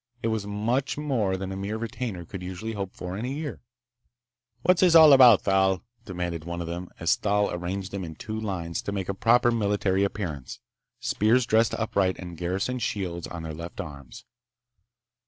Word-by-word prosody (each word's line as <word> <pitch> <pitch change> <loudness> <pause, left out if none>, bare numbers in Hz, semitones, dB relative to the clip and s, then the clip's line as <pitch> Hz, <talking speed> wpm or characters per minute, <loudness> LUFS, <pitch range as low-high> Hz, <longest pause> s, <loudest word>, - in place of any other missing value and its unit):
It 115 - +1
was 110 -2 -2
much 115 +8 -1
more 120 -11 0
than 95 0 -5
a - - -4
mere 100 +3 -3
retainer 110 -5 -4
could 95 +2 -8
usually 95 +5 -5
hope 100 -3 -5
for 90 +1 -6
in 105 - -4
a - - -2
year. 145 0 -5 1.0
"What's 180 -1 +4
this 180 -3 +5
all 160 -3 +10
about, 125 -6 +8
Thal?" 95 -2 +2 0.2
demanded 90 -3 -4
one 85 +1 -5
of 85 - -3
them 85 +2 -5
as 85 0 +3
Thal 105 0 +1
arranged 95 +2 -4
them 100 -1 -4
in 80 -2 -7
two 110 +5 -5
lines 90 -6 -3
to - - -4
make 95 -2 -3
a - - 0
proper 120 +4 +4
military 100 -3 +1
appearance, 85 -10 -4 0.4
spears 120 -1 +2
dressed 110 +1 +3
upright 100 -4 0
and 90 -2 -8
garrison 95 +9 -2
shields 90 -6 -3
on 85 -2 -7
their 80 -1 -5
left 85 +4 -8
arms. 70 -8 -8
100 Hz, 185 wpm, -26 LUFS, 90-115 Hz, 1.0 s, all